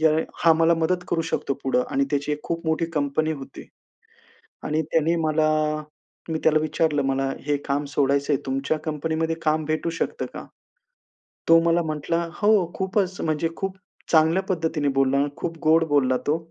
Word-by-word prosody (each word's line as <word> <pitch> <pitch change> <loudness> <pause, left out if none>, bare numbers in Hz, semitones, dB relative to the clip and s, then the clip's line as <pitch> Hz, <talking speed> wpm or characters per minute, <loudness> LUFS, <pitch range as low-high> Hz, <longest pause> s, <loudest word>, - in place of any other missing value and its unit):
येळे 160 0 +3 0.2
हा 165 - +8
मला 165 +1 +4
मदत 180 +2 0
करू 165 - +1
शकतो 140 - -1
पुढं 130 -1 +1
आणि 140 0 +2
त्याची 145 +1 -1
एक 150 - -3
खूप 165 -1 -4
मोठी 160 +1 +1
कंपनी 155 +2 0
होती. 135 -2 -9 1.0
आणि 155 +1 0
त्याने 160 +2 +1
मला 155 -1 +1 0.8
मी 160 - -1
त्याला 155 -1 +5
विचारलं, 155 -1 0
"मला 135 0 0 0.2
हे 145 -1 +2
काम 145 +1 0
सोडायचंय, 140 0 +2
तुमच्या 135 +4 -1
कंपनीमध्ये 160 +1 -1
काम 155 0 +1
भेटू 155 +2 -1
शकतं - - -2
का?" - - -7 1.1
तो 165 0 +8
मला 170 +1 +3
म्हंटला, 160 +2 -1 0.2
"हो." 210 +1 +5 0.2
खूपच, 190 -1 -1
म्हणजे 160 +1 0
खूप 190 -1 -4 0.3
चांगल्या 165 +4 +4
पद्धतीने 160 -4 0
बोलला, 135 +1 +3
खूप 165 -1 -4
गोड 160 +1 +4
बोलला 130 -3 +3
तो 155 +2 +2
155 Hz, 160 wpm, -24 LUFS, 145-165 Hz, 1.1 s, हा